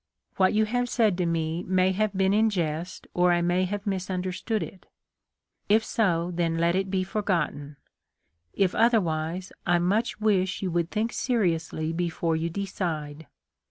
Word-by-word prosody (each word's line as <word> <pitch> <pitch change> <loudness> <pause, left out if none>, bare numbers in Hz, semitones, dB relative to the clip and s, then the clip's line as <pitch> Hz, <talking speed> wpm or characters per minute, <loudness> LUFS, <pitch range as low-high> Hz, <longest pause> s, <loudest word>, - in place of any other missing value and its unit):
' - - -59
' - - -37
What 190 +2 +3
you 215 0 +4
have 245 +3 -1
said 220 -6 +2
to 175 - +1
me 165 0 -1
may 185 0 +2
have 205 0 -1
been 190 0 +3
in 220 +1 +4
jest 170 -2 -3
or 180 0 +3
I 175 0 +2
may 180 +2 +2
have 205 +2 -4
misunderstood 185 +1 -2
it. 180 +4 -11 0.8
If 220 +2 +4
so, 175 -5 +1
then 165 -1 0
let 170 +1 +2
it 190 0 0
be 185 -1 0
forgotten; 170 -8 -2 0.7
if 185 - +1
otherwise 180 -6 +1 0.2
I 175 0 +4
much 205 +7 0
wish 200 -3 +1
you 185 - -1
would 170 0 0
think 220 +3 -1
seriously 165 -8 0
before 170 -1 -1
you 165 +1 -1
decide. 160 -5 -4
185 Hz, 165 wpm, -26 LUFS, 170-205 Hz, 0.8 s, you